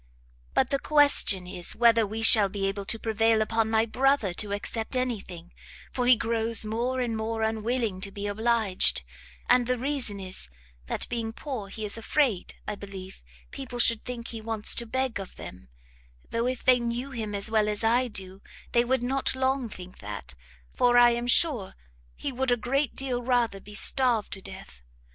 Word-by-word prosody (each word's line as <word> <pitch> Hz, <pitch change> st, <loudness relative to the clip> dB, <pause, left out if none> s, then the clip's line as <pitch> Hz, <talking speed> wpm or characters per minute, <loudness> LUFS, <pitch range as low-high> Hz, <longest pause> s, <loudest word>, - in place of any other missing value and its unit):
"But 265 Hz, -, +2 dB
the 275 Hz, -, +1 dB
question 285 Hz, -12 st, +4 dB
is 180 Hz, -1 st, -3 dB
whether 230 Hz, -2 st, +4 dB
we 220 Hz, +2 st, -5 dB
shall 215 Hz, -3 st, +7 dB
be 195 Hz, 0 st, -3 dB
able 195 Hz, 0 st, -3 dB
to 225 Hz, -, -2 dB
prevail 225 Hz, 0 st, +2 dB
upon 220 Hz, 0 st, 0 dB
my 220 Hz, 0 st, +2 dB
brother 260 Hz, -4 st, +1 dB
to 205 Hz, +3 st, -2 dB
accept 220 Hz, +4 st, -3 dB
any 255 Hz, -3 st, 0 dB
thing, 175 Hz, -2 st, -12 dB, 0.4 s
for 250 Hz, -1 st, -1 dB
he 250 Hz, -, +8 dB
grows 225 Hz, -1 st, +2 dB
more 240 Hz, +4 st, -2 dB
and 235 Hz, -2 st, -2 dB
more 220 Hz, 0 st, -2 dB
unwilling 220 Hz, -2 st, -1 dB
to 200 Hz, 0 st, -2 dB
be 200 Hz, +1 st, -6 dB
obliged, 210 Hz, -, +1 dB, 0.4 s
and 245 Hz, -1 st, +4 dB
the 250 Hz, 0 st, 0 dB
reason 255 Hz, -6 st, -2 dB
is, 185 Hz, -, -8 dB, 0.4 s
that -, -, -3 dB
being 230 Hz, -2 st, -3 dB
poor, 235 Hz, -4 st, -6 dB
he 215 Hz, +2 st, -6 dB
is 210 Hz, +2 st, -1 dB
afraid, 230 Hz, -5 st, 0 dB
I 210 Hz, -, -2 dB
believe, 195 Hz, -2 st, -10 dB, 0.3 s
people 260 Hz, -3 st, -7 dB
should 230 Hz, -2 st, +3 dB
think 240 Hz, -2 st, -6 dB
he 225 Hz, -1 st, -6 dB
wants 220 Hz, -1 st, +1 dB
to 235 Hz, -, -2 dB
beg 260 Hz, -1 st, -2 dB
of 195 Hz, -, -9 dB
them: 75 Hz, -9 st, -11 dB, 0.6 s
though 230 Hz, +1 st, 0 dB
if 255 Hz, -1 st, -3 dB
they 255 Hz, -1 st, +5 dB
knew 240 Hz, +3 st, -3 dB
him 220 Hz, -4 st, -4 dB
as 200 Hz, +2 st, -1 dB
well 215 Hz, -1 st, +2 dB
as 210 Hz, +1 st, -3 dB
I 240 Hz, +3 st, +2 dB
do, 190 Hz, -3 st, -4 dB, 0.3 s
they 235 Hz, -, +3 dB
would 255 Hz, 0 st, 0 dB
not 265 Hz, +1 st, -1 dB
long 260 Hz, -2 st, 0 dB
think 185 Hz, -3 st, -10 dB
that, 100 Hz, -7 st, -8 dB, 0.4 s
for 245 Hz, 0 st, +3 dB
I 240 Hz, 0 st, +7 dB
am 240 Hz, +1 st, -2 dB
sure 245 Hz, -, +2 dB, 0.4 s
he 280 Hz, -, -4 dB
would 260 Hz, +1 st, -2 dB
a 245 Hz, -, +3 dB
great 270 Hz, +4 st, -1 dB
deal 255 Hz, -2 st, -2 dB
rather 240 Hz, -5 st, 0 dB
be 210 Hz, +2 st, -11 dB
starved 240 Hz, -1 st, +2 dB
to 195 Hz, -, -6 dB
death. 190 Hz, -, -11 dB
225 Hz, 190 wpm, -27 LUFS, 205-245 Hz, 0.6 s, he